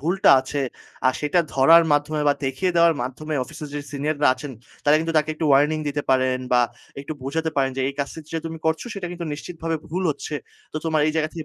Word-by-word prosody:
ভুলটা 175 +6 +3
আছে 135 +2 -4 0.5
আ - - +7
সেটা 150 +4 +2
ধরার 165 +5 +7
মাধ্যমে 150 +1 +1
বা 145 - +4
দেখিয়ে 135 +8 0
দেওয়ার 170 -1 +5
মাধ্যমে 150 +5 -4
অফিসের 150 +3 -9
যে 145 - -2
সিনিয়ররা 145 +1 0
আছেন 135 +2 -8 0.3
তারা 145 +1 +6
কিন্তু 165 +1 -2
তাকে 150 0 -1
একটু 160 - -3
ওয়ার্নিং 145 +3 +4
দিতে 145 0 -2
পারেন 130 -1 +2
বা 125 - +6 0.4
একটু 140 - -6
বোঝাতে 160 +4 -2
পারেন 135 -1 +2
যে, - - -1
এই 140 - -5
কাজটা 140 +3 -3
যেটা 165 - -3
তুমি 160 0 -6
করছো 160 +7 0
সেটা 195 -3 -4
কিন্তু 175 -1 -5
নিশ্চিতভাবে 165 +1 -4
ভুল 180 +4 -2
হচ্ছে। 150 +1 -5 0.4
তো - - -4
তোমার 160 -2 +1
এই 155 - +1
জায়গা 155 -1 +1
থেকে 165 -3 -6
155 Hz, 215 wpm, -23 LUFS, 140-165 Hz, 0.5 s, আ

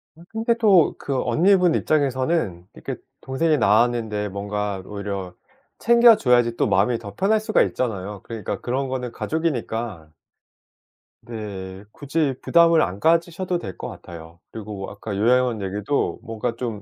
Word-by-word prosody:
아 165 - -17
근데 225 +1 0
또 195 -8 +4
그 135 -2 -2
언니분 180 +7 +3
입장에서는 130 - 0
이렇게 - - -6 0.3
동생이 155 +4 +1
나왔는데 110 -2 +2
뭔가 100 0 -3
오히려 100 -3 -5 0.5
챙겨 235 0 +6
줘야지 120 -2 +3
또 - - +1
마음이 105 +4 +2
더 100 -3 -10
편할 215 - +2
수가 215 - +2
있잖아요. 105 -5 -3
그러니까 115 -4 -5
그런 130 +2 -2
거는 125 -2 -3
가족이니까 115 - -3 1.1
네. 100 -5 -7
굳이 145 -1 -1
부담을 170 -1 +5
안 95 +2 -2
가지셔도 170 - +1
될 95 - -8
것 - - -6
같아요. 85 0 -11
그리고 105 -3 -7
아까 105 -3 -6
요양원 120 +1 +2
얘기도 100 +8 -2
뭔가 115 +1 -4
좀 115 -4 -5
120 Hz, 320 characters per minute, -23 LUFS, 100-155 Hz, 1.1 s, 챙겨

